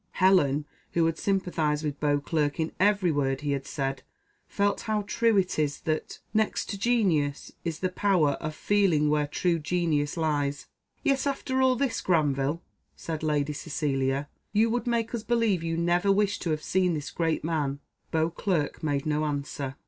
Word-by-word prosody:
Helen, 150 -7 +3 0.3
who 170 -1 +3
had 165 0 0
sympathised 170 -6 0
with 145 -1 -3
Beauclerc 145 +1 0
in 160 0 0
every 200 -2 +3
word 135 -2 0
he 145 -1 -1
had 140 -1 -2
said, 135 -2 -3 0.5
felt 200 0 0
how 215 -1 -1
true 225 +1 +2
it 185 -4 +1
is 145 -2 0
that 155 -1 -2
" - - -42
Next - - -4
to 200 - -3
genius, 180 -12 +1
is 165 -2 -4
the 185 - +1
power 185 -6 +2
Of 155 0 -4
feeling 175 -8 +2
where 150 -1 +2
true 170 +3 0
genius 155 -2 0
lies." 145 -3 0 0.4
"Yet 275 0 +2
after 265 -1 -1
all 260 -1 +4
this, 250 -2 -1
Granville," 150 -2 +1 0.3
said 160 -2 -5
Lady 150 -1 0
Cecilia, 140 -2 -1 0.3
"you 220 +2 +3
would 240 +1 -1
make 235 -1 0
us 235 - -2
believe 225 -6 +1
you 165 0 -2
never 175 +3 +2
wished 205 0 +1
to 175 - -2
have 155 -1 -1
seen 180 -2 +1
this 150 -1 -5
great 165 -2 -1
man?" 150 -4 -1 0.3
Beauclerc 160 0 -1
made 145 -3 -1
no 155 0 0
answer. 140 -2 -3
160 Hz, 170 wpm, -27 LUFS, 145-195 Hz, 0.5 s, all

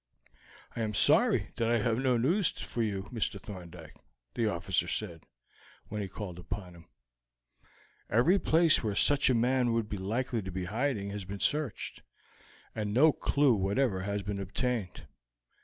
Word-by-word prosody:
"I 115 - -3
am 105 -2 -2
sorry - - +4
that 115 -1 +1
I 120 - +3
have 115 +1 0
no 130 -2 +2
news 165 - +2
for 120 - -5
you, 100 -4 -1
Mr. 110 -3 -2
Thorndyke," 90 -5 -10 0.4
the 115 - 0
officer 85 -2 -1
said, 85 -5 -4 0.6
when 105 -1 -3
he 100 - -3
called 95 -2 -7
upon 90 +1 -6
him. 85 -1 -16 1.2
"Every 165 - +4
place 165 -1 +4
where 105 -3 -1
such 140 +5 +4
a 130 - +3
man 125 0 +2
would 115 -2 0
be 105 - -4
likely 115 +4 -2
to 95 - -6
be 95 0 -4
in 90 - -4
hiding 110 -3 -1
has 100 -1 -5
been 100 +2 -7
searched, 150 -2 -1 0.7
and 105 -1 -3
no 155 +5 +6
clew 140 -3 +2
whatever 100 +1 0
has 100 +1 -3
been 100 0 -4
obtained. 105 +1 -3
105 Hz, 165 wpm, -30 LUFS, 95-125 Hz, 1.2 s, no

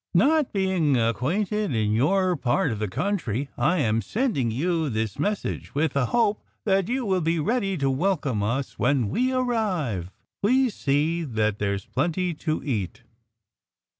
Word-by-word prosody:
Not 290 - +4
being 185 -8 +1
acquainted 175 - 0
in 105 -1 +1
your 185 - +2
part 135 -1 +1
of 110 - -4
the 105 - -1
country, 140 - -2
I 185 - +2
am 115 -3 +1
sending 205 - 0
you 160 +6 0
this 110 -3 -2
message 205 -7 -2
with 155 +2 +1
the 140 -3 +1
hope 215 - +1 0.2
that 195 -2 +2
you 255 0 -1
will 190 -3 +1
be 165 +1 +1
ready 195 +2 0
to 140 -2 0
welcome 140 - 0
us 125 +6 -2
when 125 -5 +2
we 255 - +1
arrive. 195 - -1 0.3
_Please 255 +3 +3
see 155 +1 0
that 110 -6 -1
there's 100 -1 -1
a - - -33
plenty 170 +5 0
to 155 0 -3
eat! 115 - -3
155 Hz, 160 wpm, -25 LUFS, 120-195 Hz, 0.3 s, Not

